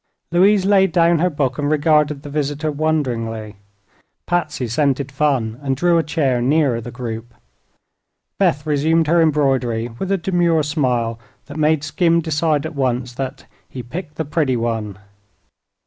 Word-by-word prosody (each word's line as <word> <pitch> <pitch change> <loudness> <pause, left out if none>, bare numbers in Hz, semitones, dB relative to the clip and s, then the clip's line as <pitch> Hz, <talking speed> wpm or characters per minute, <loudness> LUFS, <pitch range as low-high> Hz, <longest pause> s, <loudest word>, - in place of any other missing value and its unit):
Louise 190 +3 +4
laid 195 -2 +4
down 170 -1 +3
her 180 +2 +2
book 140 -5 -2
and 145 0 0
regarded 150 -1 +2
the 145 - -8
visitor 150 +1 -2
wonderingly. 120 -9 -2 0.7
Patsy 155 -7 -1
scented 135 +2 0
fun 135 -5 0
and 135 -2 -1
drew 175 +1 +3
a - - +1
chair 140 -6 0
nearer 135 -2 +2
the 120 - -8
group. 120 -1 -7 1.0
Beth 145 +2 +1
resumed 155 +2 +2
her 170 +2 +3
embroidery 135 -7 +1
with 190 - -3
a 195 - +2
demure 170 -3 +1
smile 125 -6 -1 0.3
that 145 - -9
made 155 -1 +2
Skim 170 +2 +2
decide 155 -2 0
at 160 - -5
once 125 -3 -1
that 135 +2 -6 0.2
"he 125 - -7
picked 150 +4 -7
the 160 - -3
pretty 145 -4 0
one." 110 -4 -3
145 Hz, 150 wpm, -19 LUFS, 125-160 Hz, 1.0 s, Louise